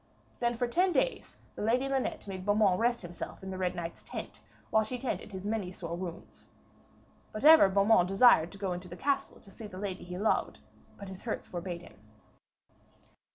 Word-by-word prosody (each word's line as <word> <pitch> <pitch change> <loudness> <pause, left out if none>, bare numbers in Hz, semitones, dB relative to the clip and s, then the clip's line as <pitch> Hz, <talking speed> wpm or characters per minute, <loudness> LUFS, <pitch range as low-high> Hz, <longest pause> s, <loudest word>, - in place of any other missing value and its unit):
Then 240 -1 +1
for 245 - 0
ten 360 +9 +2
days 355 - -1 0.2
the - - -8
Lady 245 +5 +2
Linet 270 -1 -2
made 190 -2 -6
Beaumains 205 -2 +3
rest 235 -1 +1
him 175 - -8 0.3
in 190 - -5
the 185 - -5
Red 180 -1 -1
Knight's 170 -1 -5
tent, - - -8 0.3
while 220 - +4
she 250 +4 -4
tended 245 -4 -4
his 190 0 -7
many 210 -4 -2
sore 170 -2 -5
wounds. 175 -1 -8 0.8
But 215 +6 -4
ever 315 -10 +9
Beaumains 200 -1 +4
desired 195 -4 +5
to - - -10
go 195 -2 -2
into 180 +1 -7
the 175 +1 -9
castle 280 -1 -1
to 195 - -16
see 220 - -9
the 185 - -10
lady 190 -1 -4
he 180 0 -7
loved, 210 +3 0 0.4
but 200 - -9
his 190 0 -9
hurts 230 - -4
forbade 175 -1 -6
him. - - -16
200 Hz, 195 wpm, -30 LUFS, 180-235 Hz, 0.8 s, ever